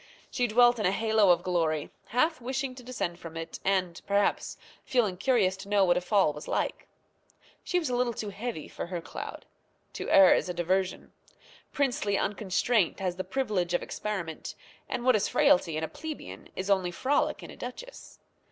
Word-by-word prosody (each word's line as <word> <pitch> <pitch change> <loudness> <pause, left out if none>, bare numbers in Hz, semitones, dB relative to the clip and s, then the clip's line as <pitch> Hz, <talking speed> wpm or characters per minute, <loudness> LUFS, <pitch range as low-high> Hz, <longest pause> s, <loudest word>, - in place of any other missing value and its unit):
She 250 -2 +1
dwelt 240 +1 +5
in 210 - +2
a - - +2
halo 220 -1 +3
of 175 0 +4
glory, 165 -4 0 0.2
half 285 +5 +1
wishing 260 +2 -2
to 255 - -11
descend 220 -8 -4
from 165 -1 -8
it, 165 0 -6
and 185 -3 0
perhaps 200 0 +1 0.3
feeling 225 -8 +1
curious 200 -3 +2
to 195 +1 -10
know 205 -2 +4
what 175 -1 +4
a 180 - +1
fall 185 -4 +3
was 150 - -9
like. - - -2 0.8
She 360 - 0
was 335 -4 0
a 250 - -1
little 245 -1 0
too 210 - -4
heavy 205 -5 -5
for - - -6
her 175 -1 -3
cloud. 165 - -8 0.5
To - - -5
err 190 -2 +8
is - - 0
a 180 - -3
diversion. 185 +2 -1 0.6
Princely 245 -8 0
unconstraint 205 0 +1
has 180 -2 -2
the 185 - -2
privilege 200 -10 -1
of - - 0
experiment, 180 -7 -5 0.3
and 240 - -3
what 255 -2 +5
is 210 - +1
frailty 270 - +3
in 160 - -2
a - - -1
plebeian 290 - -8
is 190 +2 -2
only 190 -2 +2
frolic 290 - 0
in - - -9
a - - -11
duchess. 485 - -9
200 Hz, 190 wpm, -28 LUFS, 180-245 Hz, 0.8 s, err